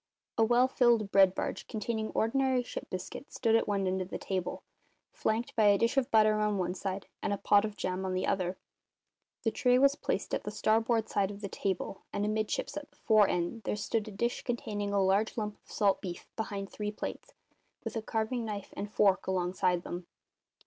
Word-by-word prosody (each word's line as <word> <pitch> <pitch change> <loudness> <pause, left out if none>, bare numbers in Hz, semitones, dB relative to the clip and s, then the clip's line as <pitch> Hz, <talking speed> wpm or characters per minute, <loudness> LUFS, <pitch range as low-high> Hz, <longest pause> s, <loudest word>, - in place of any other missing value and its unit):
A 225 - +4
well 240 +3 +4
filled 235 -5 +3
bread 190 -1 +6
barge, - - -3
containing 220 -1 -2
ordinary 260 +2 +2
ship - - -7
biscuit, 185 +9 -6
stood 225 -2 +2
at 230 - +2
one 200 -2 0
end 185 0 0
of 185 - -5
the - - -4
table, 185 -2 -3 0.5
flanked 230 - -1
by 220 - +4
a 205 -1 +6
dish 230 +6 +1
of 270 -1 +2
butter 215 -2 +4
on 210 -1 +1
one 180 -1 -1
side 195 0 -4 0.2
and - - -1
a 200 - 0
pot 205 +1 +4
of 210 -1 -6
jam 185 +1 -2
on 185 -1 -1
the 185 - 0
other; 185 -1 0 0.9
the 225 - +2
tray 250 +2 +3
was 275 +1 +5
placed - - -3
at - - 0
the - - -4
starboard 225 +2 +2
side 195 -2 +1
of 205 0 -8
the 200 - -3
table, 190 0 -3
and 205 - -1
amidships, 215 +5 -1
at 300 0 -6
the 290 - -30
fore 215 -3 +5
end, 180 +6 -1
there - - -2
stood 210 +1 -1
a - - -6
dish 235 +4 -1
containing 210 -4 -3
a 200 - +2
large 195 +4 +2
lump 210 -2 -3
of - - -18
salt 200 -3 +2
beef 175 -2 -6
behind 200 -3 -3
three 210 -1 -3
plates, 210 - -7 0.5
with - - -5
a 225 - -1
carving 225 +2 -1
knife 210 -3 -5
and 205 +1 -5
fork 200 -3 +3
alongside 180 -1 +1
them. 175 0 -6
210 Hz, 210 wpm, -31 LUFS, 195-225 Hz, 0.9 s, bread